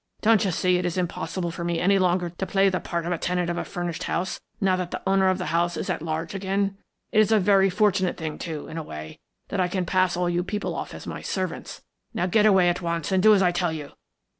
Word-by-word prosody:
Don't 225 -1 +4
you 195 - +1
see 180 +1 +2
it 180 - -2
is 175 - -3
impossible 175 0 -2
for 170 +1 -6
me 170 -1 -1
any 195 +2 +3
longer 180 -1 +1
to 180 +3 -4
play 195 0 +3
the 185 -1 -1
part 170 -1 -3
of 175 - -2
a 170 - -1
tenant 180 -1 0
of 175 - -3
a - - -2
furnished 175 -3 -4
house, 180 +3 -2 0.2
now 190 -2 +3
that 180 -1 -3
the - - -6
owner 195 0 +3
of 185 - +1
the 180 - -4
house 170 0 +1
is - - -2
at - - -3
large 160 +1 -3
again? 195 0 -1 0.4
It 215 - +3
is 215 0 +4
a 220 - +5
very 195 0 +4
fortunate 190 -2 +1
thing, 160 -2 -5
too, 155 -4 -5
in 165 - -5
a - - -5
way, 75 - -9 0.3
that 200 - -2
I 180 - +3
can 180 0 -2
pass 185 0 +2
all 180 0 +1
you 175 0 0
people 205 +3 -3
off - - -5
as - - -9
my - - -6
servants. 185 -3 -4 0.3
Now 175 - +1
get 210 +4 +4
away 190 -3 +5
at 175 +1 +1
once 170 0 -2
and 190 -1 +3
do 215 +2 +7
as 195 - +3
I 180 - +4
tell 175 -1 0
you. 150 -3 -6
180 Hz, 265 wpm, -25 LUFS, 170-195 Hz, 0.4 s, do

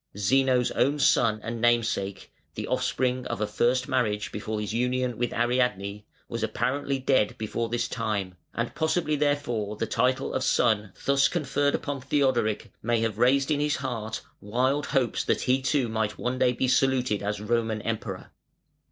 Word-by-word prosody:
Zeno's 125 +4 +3
own 145 +3 +2
son 115 -6 +3
and 115 0 -4
namesake 115 -5 0 0.2
(the - - -4
offspring 125 0 0
of - - -4
a 105 - +1
first 125 +4 +1
marriage 105 -5 0
before 105 +1 -4
his 105 0 -3
union 125 +1 0
with 120 +1 -1
Ariadne) 115 -4 0 0.2
was 115 -1 -4
apparently 135 +5 -1
dead 130 -5 +1
before 115 +1 -3
this 120 +1 -1
time; 105 -5 -2 0.2
and 115 0 -2
possibly 160 -1 0
therefore 140 -8 0
the 115 - -2
title 125 +4 0
of 130 - 0
son 110 -6 +2
thus 140 0 +4
conferred 145 -3 0
upon 140 -2 -4
Theodoric 130 -6 0
may 115 0 +1
have 115 -2 -1
raised 135 +4 +3
in 145 - +2
his 150 0 +1
heart 115 -5 -4 0.2
wild 130 +7 0
hopes 130 -5 +1
that - - 0
he 130 +1 +2
too 135 -1 +1
might 110 -2 -2
one 125 +1 -2
day 125 - +3
be 130 +1 0
saluted 125 -4 +2
as 105 0 -2
Roman 110 0 0
Emperor. 110 -4 -4
120 Hz, 165 wpm, -27 LUFS, 110-130 Hz, 0.2 s, thus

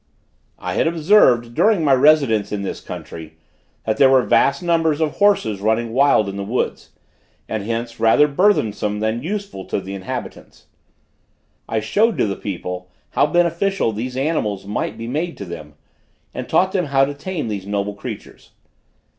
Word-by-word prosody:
I 90 0 -4
had - - +1
observed, 155 - +3
during 205 - +3
my 140 - +4
residence 135 -6 +3
in 100 -1 -3
this 95 - -5
country, 80 -1 -9 0.5
that 110 - 0
there 135 - +6
were 130 -1 +5
vast 140 +7 +2
numbers 165 -3 +1
of 155 -2 -1
horses 195 - +2
running 110 +2 0
wild 135 -5 +4
in 100 0 -5
the 100 - -3
woods, 115 +6 -3 0.6
and 110 - -3
hence 115 +2 -4
rather 115 +6 +5
burthensome 115 - +1
than 110 +2 -1
useful 195 - -5
to - - -2
the 95 0 -7
inhabitants. 95 -1 -7 1.0
I 110 -1 0
showed 210 - +1
to - - +2
the 100 -2 -2
people 90 -2 -6 0.2
how - - +3
beneficial 175 - +1
these 125 +4 -5
animals 120 -10 -1
might 105 +1 -3
be 115 - -6
made 155 +8 -3
to 100 - -6
them, 75 -4 -9 0.6
and - - -6
taught 190 0 +3
them 185 -3 0
how 135 -1 +3
to 145 - -5
tame 155 -1 -5
these 100 -3 -5
noble 100 0 -2
creatures. 100 - -9
120 Hz, 165 wpm, -20 LUFS, 105-160 Hz, 1.0 s, there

